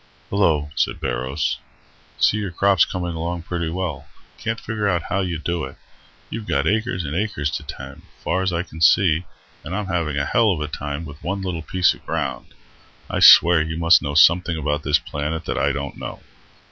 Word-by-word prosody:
"Hello," 80 -7 +1
said - - 0
Barrows. 65 +5 -2 0.6
"See 105 - +3
your 105 -2 -3
crop's 95 +1 +3
coming 90 -1 -4
along 85 +1 -4
pretty 85 -2 -3
well. 80 -5 -4 0.3
Can't 115 0 -3
figure 105 -6 -1
how 100 +4 -2
you 90 -3 -2
do 85 0 -3
it. 65 - -8 0.5
You've 110 -1 -5
got 70 -4 0
acres 105 -1 0
and 75 +1 -4
acres 90 -7 -1
to - - -4
tend, 70 +1 -9 0.2
far's 95 +1 0
I 85 0 -1
can 80 -3 -12
see, 85 +2 +4 0.4
and 85 +3 -5
I'm 105 0 -2
having 85 -6 -2
a 70 - 0
hell 115 0 +3
of 80 - -5
a 75 - -2
time 75 +1 -5
with 75 -1 -11
one 100 +2 -3
little 90 -3 -3
piece 90 +3 +2
of - - -17
ground. - - -4 0.6
I - - -1
swear 85 -1 +8
you 80 0 -3
must 85 -2 +5
know 70 0 -4
something 85 +1 +5
about 75 -1 -1
this 75 - +3
planet 75 +3 -4
that - - -2
I - - +2
don't 70 0 -5
know." - - -7
85 Hz, 195 wpm, -22 LUFS, 75-95 Hz, 0.6 s, swear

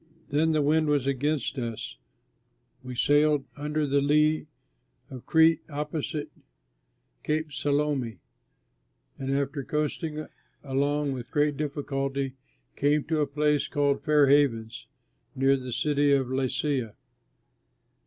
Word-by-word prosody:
Then 150 +3 +2
as - - +2
the 155 - +2
wind 155 +2 +2
was 145 -3 +1
against 140 +1 -1
us 115 -3 -5 0.9
we 125 -1 -7
sailed 145 +2 +3
under 150 +1 -1
the 140 0 +2
lee 150 +2 +2 0.6
of 130 -2 -9
Crete, 160 0 +5
opposite 150 0 -4 0.9
Cape 155 0 -1
Salmone, 145 -6 -1 1.0
and 135 0 -4
after 140 +1 -1
coasting 150 +1 -2 0.4
along 145 +1 0
with 125 -2 -6
great 145 -1 +1
difficulty 140 -2 -2 0.4
came 145 +1 +2
to 160 -1 0
a 145 - +1
place 150 0 +1
called 145 -2 +1
Fair 150 -2 +4
Havens, 125 -5 +2 0.5
near 135 +1 +3
the 130 -1 -6
city 145 +2 +2
of 135 -2 +1
Lasea. 130 -2 -1
145 Hz, 120 wpm, -27 LUFS, 135-150 Hz, 1.0 s, Crete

